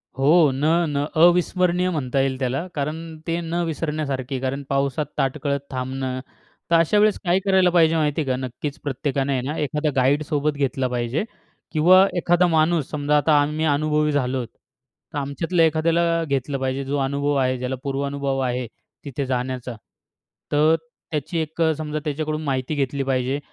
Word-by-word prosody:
हो. 150 +3 +4
न 135 - -4 0.3
न 140 0 -1 0.2
अविस्मरणीय 180 +1 +3
म्हणता 140 -5 -1
येईल 135 -1 0
त्याला 135 +6 -1
कारण 150 +2 -2 0.3
ते 170 +1 0
न 170 +1 -2
विसरण्यासारखे 145 -5 -3
कारण 135 +2 -3
पावसात 140 +1 0
ताटकळत 140 +1 0
थांबणं. 130 0 -3 0.5
तर - - +6
अशा 165 +5 +3
वेळेस 210 -1 +4
काय 180 0 +2
करायला 190 -2 +4
पाहिजे 165 -2 +4
माहिती 150 -1 +1
आहे 145 - -4
का. 130 - +2
नक्कीच 140 +4 -6
प्रत्येकाने 140 0 -1
आहे 130 - 0
ना 150 - -3
एखादा 150 +1 -1
गाईड 135 +3 +3
सोबत 150 0 0
घेतला 135 -2 0
पाहिजे. 125 - -1 0.5
किंवा 180 +4 +6
एखादा 175 +1 +3
माणूस 160 -2 +2
समजा 150 0 +1
आता 150 +1 +3
आम्ही 150 +2 -1
अनुभवी 150 0 +1
झालोत, 130 -3 -1 0.7
तर - - -3
आमच्यातलं 165 +5 -1
एखाद्याला 165 +1 +2
घेतलं 140 0 -1
पाहिजे. 130 +1 -2
जो 140 +2 -1
अनुभव 140 +1 0
आहे 130 -1 +1
ज्याला 125 +1 -3
पूर्वानुभव 140 -1 -2
आहे 125 -1 -1 0.4
तिथे 140 0 -3
जाण्याचा. 125 -1 -3 0.8
तर 155 +2 +4 0.4
त्याची 155 +2 -3
एक 160 +1 -4
अ, 160 -1 +4
समजा 155 -1 -3
त्याच्याकडून 155 +1 -2
माहिती 135 0 -2
घेतली 140 0 -1
पाहिजे 130 +1 0
145 Hz, 160 wpm, -22 LUFS, 135-160 Hz, 0.8 s, तर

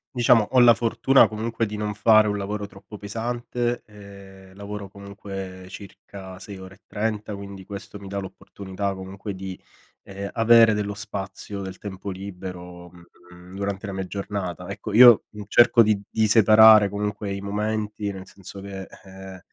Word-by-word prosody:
Diciamo 120 -3 +4
ho 130 - +5
la 120 -1 +8
fortuna 120 +4 +3
comunque 115 +1 -3
di 105 - -6
non 105 0 -3
fare 110 +1 +5
un 105 - -1
lavoro 105 +1 -4
troppo 100 +1 -13
pesante. 120 +3 -3
Ehm, 100 -2 -14
lavoro 100 0 -7
comunque 95 -2 -9
circa 95 -1 -11
6 100 +1 -10
ore 95 0 -11
e 100 - -30
30 105 -1 -3
quindi 100 -1 -9
questo 100 +1 -9
mi 100 - -11
dà 100 +1 -5
l'opportunità 100 0 -5
comunque 95 +1 -7
di, 95 -1 -7 0.4
ehm, 100 +1 -7
avere 115 -1 +6
dello 105 -1 -3
spazio, 100 -1 -7
del 95 -1 -7
tempo 100 0 -7
libero, 90 -2 -8
mhmm, 90 +1 -17
durante 100 +1 -4
la 100 - -5
mia 95 -1 -4
giornata. 100 -3 -5
Ecco, 105 - -7
io 120 0 +8 0.2
cerco 120 +2 +6
di 105 -2 +1
di 110 -1 +1
separare 110 -1 +7
comunque 105 0 -4
i 100 - -4
momenti, 105 0 -3
nel 95 -1 -9
senso 100 +1 -11
che 95 -1 -8 0.2
ehm 95 0 -11
100 Hz, 160 wpm, -24 LUFS, 95-105 Hz, 0.4 s, la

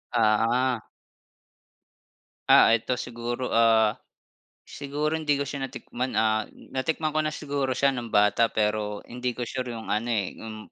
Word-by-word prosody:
Oo. 115 +2 +2 1.7
Ah, 115 - +7
eto 115 +2 0
siguro, 120 +1 -4
ah, 115 -2 +4 0.7
siguro 150 +3 -3
hindi 150 -2 +1
ko 140 - 0
siya 140 -1 -4
natikman 125 0 -5
ah, 110 0 +2 0.2
natikman 155 +4 -1
ko 155 - -1
na 155 - -1
siguro 140 -4 -2
siya 140 +2 +3
nung 120 -4 -5
bata 105 +3 +4
pero 105 -1 -1
hindi 125 0 -3
ko 125 - -5
sure 125 0 -4
'yong 110 -2 -7
ano, 105 +3 0
eh, 100 -3 -2
'yong 110 -1 -8
120 Hz, 145 wpm, -26 LUFS, 110-135 Hz, 1.7 s, Ah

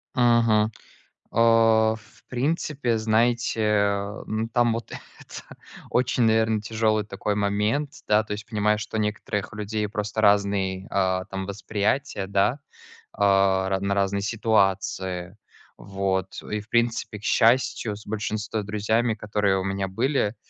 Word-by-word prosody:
Мгм. 115 -3 +3 0.6
А, 115 -1 +4
в 110 -1 -21
принципе, 135 -2 -1
знаете, 115 +1 +1 0.7
м, 110 +1 -2
там 120 -1 +3
вот 115 0 -5
это - - -11 0.3
очень, 125 0 +1
наверно, 110 -1 +2
тяжелый 110 -1 0
такой 105 0 -3
момент, 105 +8 0 0.2
да. 105 +1 +4
То 105 - -6
есть 105 +1 -5
понимаю, 105 -1 +1
что 110 0 -5
у - - +1
некоторых 105 -1 -3
людей 105 0 -3
просто 105 0 -3
разный, 100 -2 +2
а, 95 -1 +1
там 95 -1 -5
восприятие, 105 +2 -2
да. 100 +8 +1 0.5
А 95 -1 +3
ра 95 0 0
на 100 +1 0
разные 100 0 0
ситуации. 95 -4 0 0.4
Вот 95 -1 -3
и, 105 0 -4
в 105 - -15
принципе, 120 -2 0
к - - -19
счастью, 115 -3 +2
с 105 - -14
большинством 110 0 -3
друзьями, 110 +3 0
которые 105 -2 0
у 95 - -3
меня 95 0 -2
были, 115 +1 0
105 Hz, 135 wpm, -25 LUFS, 100-115 Hz, 0.7 s, А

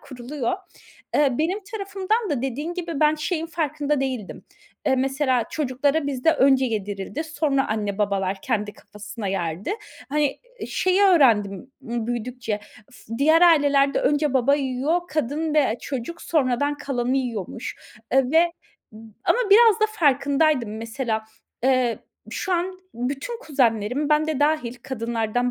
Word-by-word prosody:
kuruluyor. 255 -1 -4 0.6
Eee, 290 -2 +4
benim 345 +6 0
tarafımdan 400 +1 -1
da 265 -4 -1
dediğin 290 +7 -3
gibi 335 -5 -4
ben 305 0 +5
şeyin 325 +1 -2
farkında 300 -3 -1
değildim. 255 -7 -4 0.4
Eee, 265 - +3
mesela 265 -2 +1
çocuklara 285 +1 0
bizde 275 +2 +2
önce 270 -3 +4
yedirildi, 205 +6 -3
sonra 295 -3 0
anne 210 -2 -2
babalar 195 -2 0
kendi 210 -4 -1
kafasına 210 0 -8
yerdi. 180 - -2 0.4
Hani, 290 0 0 0.3
şeyi 370 +2 +2
öğrendim 245 - +3
b 235 -3 -4
büyüdükçe, 240 -3 -3 0.3
ıs - - -18
diğer 315 +4 +5
ailelerde 285 -4 +4
önce 290 -1 +1
baba 265 +2 +4
yiyor, 280 +4 0
kadın 305 +1 -1
ve 275 -7 +3
çocuk 275 +5 -5
sonradan 285 -1 +1
kalanı 265 -3 -1
yiyormuş, 235 -2 -4 0.4
eee, 260 -1 +3
ve 335 +2 +4 0.7
ama - - +3
biraz 445 +1 +7
da 435 - +5
farkındaydım 280 - +2
mesela, 225 0 -3 0.4
eee, 255 -3 +2 0.3
şu 380 - -3
an 365 +2 -1 0.2
bütün 275 - -4
kuzenlerim, 255 - 0
ben 305 0 +3
de 310 -3 -2
dâhil 290 -5 +1
kadınlardan 235 -1 -1
270 Hz, 130 wpm, -23 LUFS, 235-310 Hz, 0.7 s, biraz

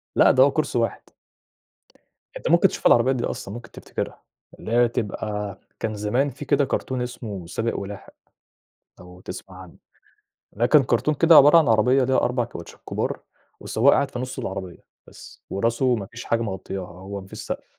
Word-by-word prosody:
لأ، - - +6
ده - - +6
هو - - +4
كرسي - - -1
واحد. - - -1 1.4
أنت - - -3
ممكن 170 +3 +5
تشوف - - -5
العربيات 130 +2 +5
دي 120 - -3
أصلًا 100 - -5
ممكن 120 -1 -10
تفتكرها، - - -6 0.4
اللي 115 - -6
هي 120 0 +4
تبقى 105 -2 -4 0.2
كان 110 -1 -2
زمان 120 +7 0
في 145 +3 -9
كده 140 0 +2
كرتون 130 -1 -2
اسمه 110 -7 -6
سابق 115 +6 -2
ولاحق، 100 -1 -8 0.9
لو 90 0 -14
تسمع 95 -1 -9
عنه. 90 - -14 0.7
ده 115 +4 0
كان 145 +1 +5
كرتون 125 +5 +1
كده 165 +2 +5
عبارة 145 +4 +8
عن 160 - +4
عربية 125 +4 +4
ليها 130 +1 +2
4 125 0 +1
كاوتشات 85 -7 -11
كبار - - -2 0.4
والسواق 130 +6 +3
قاعد 140 - +1
في 120 - -5
نص 130 0 -5
العربية 95 -3 -6 0.2
بس - - -14
وراسه 120 +5 +1
ما 100 -3 -5
فيش 115 +5 -10
حاجة 115 0 0
مغطياها، 95 -3 -5
هو 95 +3 -8
ما 95 - -13
فيش - - -10
سقف. - - -5
115 Hz, 180 wpm, -23 LUFS, 100-130 Hz, 1.4 s, عبارة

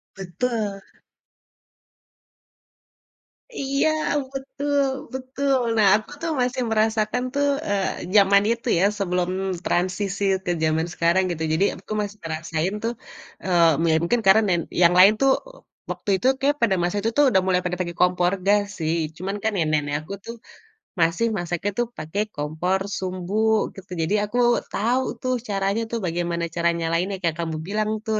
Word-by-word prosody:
Betul 195 +2 -3 2.7
Iya, 275 -1 0 0.4
betul 280 +1 -1 0.3
betul, 265 +1 -1 0.2
nah 210 -2 +5
aku - - -17
tuh 330 -1 -1
masih 250 +1 0
merasakan 220 +2 +1
tuh, 285 0 +1 0.2
eee, 195 -2 -2
zaman 200 0 +6
itu 235 +1 -3
ya, - - +3 0.2
sebelum 180 -2 0 0.4
transisi 190 +2 -1 0.2
ke 175 - 0
zaman 160 +1 +1
sekarang 170 +3 +2
gitu. 160 -1 -3
Jadi 195 +5 +3
aku - - -14
masih 205 +1 -5
ngerasain 160 +3 -2
tuh, 235 +1 -1 0.5
eee, 170 -3 +3
ya - - +4
mungkin 230 +7 +1
karena 205 +3 +7
nen 175 -2 +2 0.2
yang 175 0 +6
lain 195 +3 +8
tuh, 270 0 +5
e - - -15 0.3
waktu - - -6
itu 250 - 0
kayak 290 +1 +2
pada 200 -5 +3
masa 175 +4 0
itu 225 +3 -1
tuh 290 -2 +6
udah 190 -5 +3
mulai 180 -1 +2
pada 180 0 -3
pake 170 -2 -3
kompor 180 0 +3
gas 205 0 +4 0.2
sih, 160 +1 0 0.2
cuman 195 +3 -4
kan 220 -1 0
nenek 155 -5 +1
nek 145 0 -2
aku 175 +6 -8
tuh, 230 - -6 0.6
masih 165 +8 +2
masaknya 175 +3 -2
tuh 240 - +1
pake 160 +6 -4 0.2
kompor 160 +6 -1 0.2
sumbu, 195 +4 0
gitu. 195 -2 -13
Jadi 165 +6 +1
aku 210 +4 -3 0.3
tau 245 +5 0 0.2
tuh 255 0 0
caranya 195 +2 0
tuh 230 - -1
bagaimana 170 0 -2
cara 170 0 +2
nyalainnya, 170 +4 -1
kayak 165 -1 0
kamu 165 -1 -2
bilang 215 +1 -1 0.2
tuh, 220 -1 0
195 Hz, 160 wpm, -23 LUFS, 175-225 Hz, 2.7 s, lain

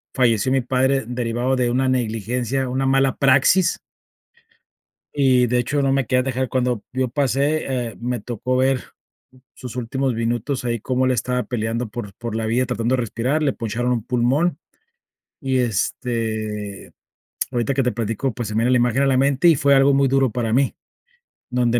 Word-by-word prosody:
falleció 120 -1 +2
mi 135 0 +2
padre 130 +2 +1
derivado 120 +1 -1
de 125 -2 +1
una 130 +2 +1
negligencia, 125 +1 -1
una 130 +2 -1
mala 135 0 +2
praxis. 140 +7 +3 1.4
Y, 130 -3 +4
de 125 +1 +1
hecho, 145 +4 -1
no 135 -1 +2
me 135 -2 +1
querían 125 0 +2
dejar 130 -1 -2
cuando 125 -3 -1
yo 130 0 0
pase, 135 -2 0
eh, - - -14
me 120 +1 -2
tocó 125 +2 -3
ver 130 0 +2 0.7
sus 125 -1 -9
últimos 130 +2 -1
minutos 120 +4 -2
ahí 120 -1 -1
como 130 +4 0
él 130 - +2
estaba 125 +1 -1
peleando 115 0 -2
por 105 -2 -7
por 115 -2 -5
la 110 - -2
vida 120 +3 +1
tratando 120 +1 0
de - - -1
respirar, 125 +6 -1
le 140 -3 +1
poncharon 120 +2 -2
un 115 -3 -2
pulmón, 130 +7 +1 0.8
y, 135 -2 -1
este, 110 -3 -2 0.6
ahorita 120 +1 -1
que 135 - +1
te 125 - +1
platico, 115 +3 -2
pues, 120 0 -5
se 105 - -5
me - - +1
viene 125 - +2
la 130 - +4
imagen 125 +2 +2
a - - +3
la 135 -1 +3
mente 140 +5 +3
y 165 - +6
fue 140 +1 +3
algo 135 +1 +5
muy 140 0 +3
duro 135 -1 +2
para 115 0 -2
mí, 135 +2 +1 0.8
donde 120 -1 +2
125 Hz, 180 wpm, -21 LUFS, 115-135 Hz, 1.4 s, y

